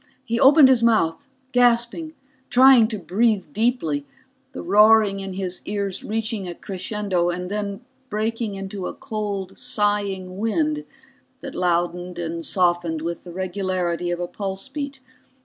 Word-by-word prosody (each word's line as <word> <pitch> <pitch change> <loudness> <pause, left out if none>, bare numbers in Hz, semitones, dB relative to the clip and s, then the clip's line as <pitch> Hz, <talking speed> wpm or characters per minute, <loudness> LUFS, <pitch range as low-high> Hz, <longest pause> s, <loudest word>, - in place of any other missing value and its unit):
He 235 -1 -1
opened 280 +2 +8
his 260 -3 +4
mouth, 225 0 +2 0.2
gasping, 245 +6 +2 0.3
trying 255 -3 +7
to 220 -1 -4
breathe 205 +1 0
deeply, 205 - 0 0.4
the - - -7
roaring 210 -1 +5
in 195 -1 -5
his 185 -1 -4
ears 200 -2 -3
reaching 220 -2 -3
a 175 - -6
crescendo 190 -2 -2
and 180 +1 -4
then 205 0 -3 0.3
breaking 220 0 -2
into 195 -1 -5
a - - -6
cold 200 -3 -5
sighing 205 -6 -1
wind 300 +7 0 0.6
that - - -7
loudened 175 0 -1
and 170 -1 -4
softened 175 -3 +1
with 170 0 -4
the 175 - -8
regularity 180 -1 -2
of 175 0 -2
a 175 - -1
pulse 195 +3 -5
beat. 280 -1 -6
200 Hz, 140 wpm, -23 LUFS, 180-225 Hz, 0.6 s, opened